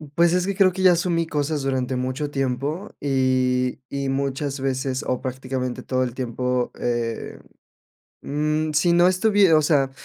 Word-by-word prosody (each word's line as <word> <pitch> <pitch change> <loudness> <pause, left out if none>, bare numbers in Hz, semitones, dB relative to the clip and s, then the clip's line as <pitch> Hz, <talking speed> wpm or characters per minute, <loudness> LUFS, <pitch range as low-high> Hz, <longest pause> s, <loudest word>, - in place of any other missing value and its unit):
Pues, 170 0 +4
es 180 0 +1
que 200 - -1
creo 190 -1 +4
que 190 +1 -5
ya 185 -1 +6
asumí 170 -1 0
cosas 150 -1 -1
durante 130 -1 -1
mucho 130 +4 -3
tiempo, 140 +7 -2
y 130 -2 +1
y 140 -1 -3
muchas 140 +1 -2
veces, 130 0 -2
o 125 - -1
prácticamente 130 -1 -4
todo 130 0 0
el 125 -1 -4
tiempo, 125 0 -2
eh, 120 -2 -3 0.8
mm, 150 +2 -1
si 170 +3 +3
no 175 +1 +5
estuvie 195 0 +4
o 155 - +5
sea, 145 -3 +2
135 Hz, 160 wpm, -23 LUFS, 130-165 Hz, 0.8 s, ya